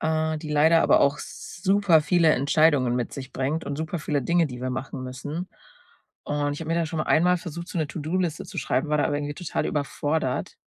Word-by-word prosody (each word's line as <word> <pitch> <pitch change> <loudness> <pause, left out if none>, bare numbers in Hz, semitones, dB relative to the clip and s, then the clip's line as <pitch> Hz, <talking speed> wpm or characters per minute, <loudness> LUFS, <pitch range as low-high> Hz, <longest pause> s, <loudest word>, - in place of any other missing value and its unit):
äh, 160 0 0
die 150 0 -7
leider 160 +2 +5
aber - - +5
auch 140 +1 +3
super 190 -2 +1
viele 165 -1 +4
Entscheidungen 140 -2 +3
mit 120 - -3
sich 130 -1 -8
bringt 140 +5 -2
und 140 - -4
super 160 +3 -3
viele 145 -2 -1
Dinge, 170 +4 +2
die 125 -3 -8
wir 130 0 -2
machen 130 0 -5
müssen. 145 +8 -5 0.8
Und 145 0 -1
ich - - -8
habe 160 - -6
mir - - +2
da 170 - +1
schon 160 0 -3
einmal 180 +4 +3
versucht, 170 0 -7
so - - -7
'ne 155 -2 -1
To-do-Liste 165 +1 -2
zu - - -10
schreiben, 130 +5 0
war 150 - +2
da 145 - +1
irgendwie 145 0 -2
total 175 0 -3
überfordert. 145 -1 -1
155 Hz, 210 wpm, -25 LUFS, 140-165 Hz, 0.8 s, leider